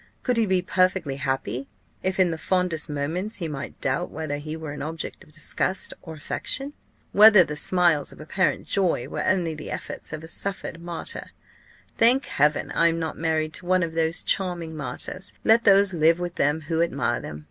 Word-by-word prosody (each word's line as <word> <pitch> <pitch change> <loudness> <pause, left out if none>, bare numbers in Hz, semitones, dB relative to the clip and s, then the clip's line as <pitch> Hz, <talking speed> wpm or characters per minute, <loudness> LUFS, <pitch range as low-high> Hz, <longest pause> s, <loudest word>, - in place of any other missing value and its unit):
Could 250 -2 +1
he 225 -2 +2
be 185 -1 +1
perfectly 185 -6 +1
happy, 135 -2 -2 0.3
if, 190 +1 -2
in 180 -2 +4
the 165 - -3
fondest 180 -4 0
moments, 160 +9 -3
he 175 -5 -3
might 140 -2 -6
doubt 140 +7 -1
whether 155 -2 -4
he 155 +2 -6
were 160 -2 -6
an 145 - -7
object 160 +2 -6
of - - -20
disgust 165 +4 -2
or 160 -2 -9
affection? 270 - -3 0.4
whether 210 -2 +8
the 150 -2 -5
smiles 165 -2 +3
of - - -14
apparent 185 +5 0
joy 190 -4 0
were - - -3
only 175 -4 +1
the 155 0 -8
efforts - - -5
of 155 0 -6
a - - -8
suffering 170 -2 -3
martyr? 170 -1 -6 0.7
Thank 245 +4 +4
Heaven! 150 +2 +1
I 170 - +3
am 165 0 +1
not 160 -1 -3
married 160 -1 -1
to 175 - -4
one 185 0 +3
of 165 -1 -3
these 165 +1 +1
charming 175 -4 -1
martyrs. 185 +5 -2
Let 230 +1 +4
those 200 -1 +5
live 165 0 +4
with 175 -1 -3
them 150 0 +1
who 160 +2 -1
admire 130 -8 0
them. 75 -1 -7
165 Hz, 190 wpm, -25 LUFS, 155-185 Hz, 0.7 s, whether